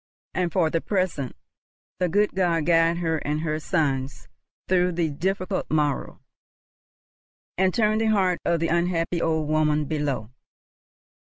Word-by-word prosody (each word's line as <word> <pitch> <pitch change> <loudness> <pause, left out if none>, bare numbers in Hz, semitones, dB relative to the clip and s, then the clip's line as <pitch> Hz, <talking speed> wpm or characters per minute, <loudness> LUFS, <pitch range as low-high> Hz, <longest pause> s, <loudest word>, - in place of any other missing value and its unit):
And 180 -2 0
for 165 -3 +2
the 165 - 0
present!—the 180 - -4
good 205 +4 +2
God 170 -4 +1
guide 165 0 +3
her 165 -2 0
and 150 +1 -2
her 155 -1 -1
sons 140 -5 -1 0.4
through 180 -1 +2
the 165 -2 0
difficult 185 +5 -2
morrow, 150 -2 -1 1.4
and 190 +1 +2
turn 215 +1 +2
the 225 - +1
heart 190 -5 +2
of 170 -1 +1
the 165 - +1
unhappy 170 0 0
old 160 -2 0
woman 150 -1 +2
below! 140 -7 -2
165 Hz, 135 wpm, -25 LUFS, 155-180 Hz, 1.4 s, guide